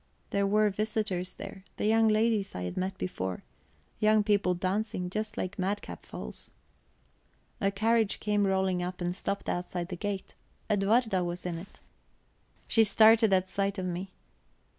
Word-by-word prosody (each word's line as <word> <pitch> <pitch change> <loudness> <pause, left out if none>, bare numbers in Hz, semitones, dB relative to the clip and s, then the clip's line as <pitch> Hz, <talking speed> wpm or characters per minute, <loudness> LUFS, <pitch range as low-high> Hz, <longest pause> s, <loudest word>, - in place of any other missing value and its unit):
There 200 0 +2
were 210 +1 +3
visitors 205 -3 -2
there 195 - -8
the - - -1
young 225 +1 +4
ladies 215 -1 +2
I 90 - -3
had 90 - -4
met 190 +1 -2
before 95 - -4 0.6
young 215 0 +4
people 200 -3 +2
dancing, 185 0 -2
just 215 +1 -3
like 185 +2 -3
madcap 185 - -3
foals. 60 - -8 1.1
A 195 - +3
carriage 220 +1 +2
came 205 -1 +1
rolling 190 -1 +1
up 180 0 -4
and 175 0 -2
stopped 200 +1 -3
outside 175 0 -2
the 180 - -4
gate; 200 +1 -4 0.4
Edwarda 205 -1 +2
was 175 +1 -4
in 170 -2 -3
it. 190 +4 -13 0.9
She 225 - +5
started 220 +1 +6
at 190 -1 +3
sight 200 +1 -1
of 185 - -2
me. 180 +2 -3
195 Hz, 155 wpm, -29 LUFS, 180-215 Hz, 1.1 s, started